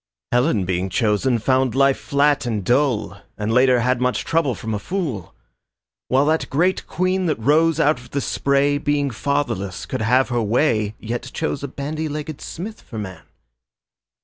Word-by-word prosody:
Helen 120 - +2
being 90 +1 -1
chosen 110 +6 +1
found 130 +1 +1
life 135 0 +3
flat 140 -2 +1
and 105 -5 -2
dull 125 -2 +1 0.2
And 105 +1 -1
later 125 0 +4
had 125 +1 +1
much 125 0 0
trouble 160 -7 +1
from 110 +2 -5
a 105 - -1
fool, 135 - -4 0.7
While 135 +2 +3
that 160 +1 +1
great 175 +7 +1
Queen, 185 +1 0
that 155 - +1
rose 155 +6 +3
out 150 -4 +3
of 125 -1 -14
the 140 - -2
spray, 140 +1 +1
Being 145 -2 0
fatherless 115 -7 -2
could - - -4
have 125 +5 +3
her 120 -1 0
way 110 -2 +1
Yet 120 +3 -4
chose 160 -3 -2
a 140 - -3
bandy 155 +4 -4
legged 150 0 -5
smith 215 +6 -7
for 115 - -10
man. 95 -3 -6
130 Hz, 170 wpm, -21 LUFS, 115-150 Hz, 0.7 s, later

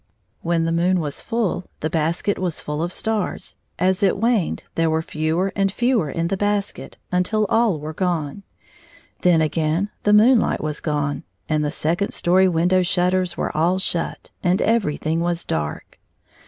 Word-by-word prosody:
When 165 -1 +1
the 165 - 0
moon 175 +2 +2
was 145 -3 -4
ftdl, 215 -6 -1 0.2
the 155 - -1
basket 170 +6 0
was 180 -3 -2
fiill 150 +1 -4
of 175 - -2
stars; 220 0 -2 0.2
as 185 +2 +1
it 200 0 +3
waned 225 -3 0
there 165 0 +1
were 160 0 0
fewer 160 +5 -1
and 195 -1 +1
fewer 240 - +1
in 165 +4 -1
the 195 - -1
basket, 205 0 -2
until 180 +4 +1
all 225 -8 +2
were 155 +2 -6
gone. 170 -1 -2 0.8
Then 175 -3 +4
again 160 +5 0
the 205 - +2
moon 225 +4 +6
light - - -1
was 155 0 -3
gone, 145 -2 -2 0.2
and 155 -1 +1
the 150 - 0
second 165 +6 -1
story 185 +2 +4
window 180 +2 +2
shutters 180 0 +1
were - - -2
all 170 +4 +2
shut, 180 -3 -3
and 180 0 +2
everjiihing 165 -7 +1
was 170 0 -1
dark. 75 -1 -4
175 Hz, 170 wpm, -22 LUFS, 160-195 Hz, 0.8 s, moon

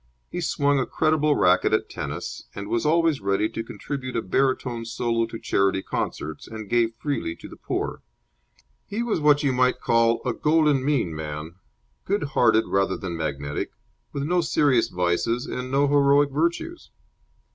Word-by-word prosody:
He 175 - -3
swung 145 -3 +1
a 130 - -1
creditable 155 -1 +2
racket 90 0 +3
at - - +1
tennis, - - -6
was 105 +5 -1
always 165 -3 +2
ready 100 +2 +1
to 115 - -4
contribute 130 +4 -6
a 115 - 0
baritone 125 +1 0
solo 115 0 -1
to 115 - -7
charity 95 -3 +1
concerts, 80 +1 -4
and 110 -2 -8
gave 115 +1 +1
freely 130 - -3
to - - -11
the - - -11
poor. - - -3 0.9
He 215 +3 -2
was 230 -7 0
what 150 -1 +4
you 135 -2 +2
might 125 0 +2
call 115 0 +3
a 125 - 0
golden 150 -1 +2
mean 130 - 0
man, 75 +1 -6 0.5
good 200 +2 0
hearted 120 -5 +3
rather 95 -1 +1
than 90 -3 -5
magnetic, 70 -2 -3 0.4
with 140 - -3
no 175 +4 +2
serious 145 -6 +2
vices 90 +7 0
and 125 0 -5
no 140 +2 +2
heroic 140 0 +4
virtues. 170 - -2
125 Hz, 160 wpm, -24 LUFS, 100-145 Hz, 0.9 s, what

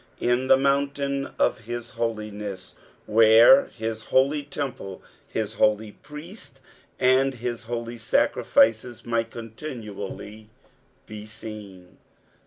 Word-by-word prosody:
"In 125 +2 +1
the - - +7
mount/tin 140 0 0
of 110 - +1
his 120 +1 -5
holiness." 105 -4 -4 0.3
Where 115 - +7
his 110 -1 -5
holy 140 +3 +2
t«mple, 135 -9 -6 0.3
his 110 -1 -3
holy 105 0 +2
priesta, 150 0 -10 0.4
and 130 0 +3
bis 120 -1 -4
holy 120 0 -4
sacrificea 115 +1 +2
might 115 -1 -1
continually 110 -4 -8 0.6
be 105 0 -9
seen. 105 -4 -10
115 Hz, 100 wpm, -25 LUFS, 110-130 Hz, 0.6 s, the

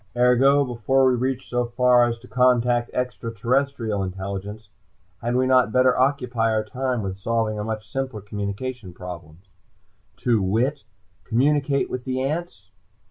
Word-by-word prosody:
"Ergo: 130 +3 +4
Before 130 +2 +1
we 130 - +4
reach 130 +1 -2
so 125 0 0
far 125 0 +4
as 120 -1 -2
to 120 +2 -16
contact 120 0 +2
extra 125 -2 -3
terrestrial 115 -2 -1
intelligence, 100 +3 -5 0.5
had 120 +1 -1
we 130 +1 +2
not 130 -4 +4
better 130 +1 +4
occupy 125 -4 +1
our 110 -1 +1
time 125 +1 -2
with 95 0 -5
solving 110 0 -1
a - - -2
much 110 -1 -4
simpler 130 -4 -4
communications 105 0 -5
problem; 85 -4 -9 0.8
to 115 -4 +1
wit: 115 +8 0 0.4
communicate 140 +3 +1
with 125 -1 -5
the 130 0 -2
ants? 135 - -4
120 Hz, 145 wpm, -23 LUFS, 105-130 Hz, 0.8 s, Ergo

